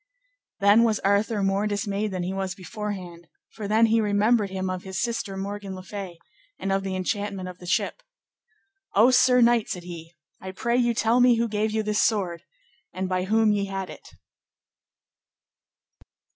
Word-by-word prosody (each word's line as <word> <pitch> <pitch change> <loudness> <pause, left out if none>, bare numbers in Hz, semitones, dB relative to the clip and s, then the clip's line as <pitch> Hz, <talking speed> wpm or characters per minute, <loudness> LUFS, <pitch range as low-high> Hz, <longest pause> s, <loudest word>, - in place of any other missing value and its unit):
Then 205 +3 +6
was 220 -2 +2
Arthur 200 +1 +1
more 195 +2 +1
dismayed 205 0 -2
than 185 -2 -3
he 185 +2 -3
was 190 -1 -3
beforehand; 185 -4 -7 0.2
for 210 -2 -6
then 220 +2 +4
he 225 0 +3
remembered 210 +1 +2
him 190 0 -3
of 185 -1 -3
his 190 0 -5
sister 230 -5 -2
Morgan 200 0 -5
le 185 - -9
Fay, 190 -3 -7 0.4
and 195 - -3
of 195 0 +1
the 190 -1 -4
enchantment 195 0 -3
of 180 -1 -9
the 180 - -11
ship. 340 - -1 0.9
O 225 +6 +6
sir 250 0 +5
knight, 235 -1 +3
said 180 - -4
he, 170 -1 -10 0.3
I 190 0 -7
pray 235 +5 -1
you 240 -1 +2
tell 225 +2 +2
me 245 -1 +6
who 230 +1 0
gave 215 0 -1
you 220 0 -1
this 210 0 +1
sword, 185 -7 0 0.5
and 185 +1 -3
by 185 0 -1
whom 220 +2 +3
ye 200 -1 0
had 195 -1 -5
it. - - -13
200 Hz, 175 wpm, -25 LUFS, 190-220 Hz, 0.9 s, Then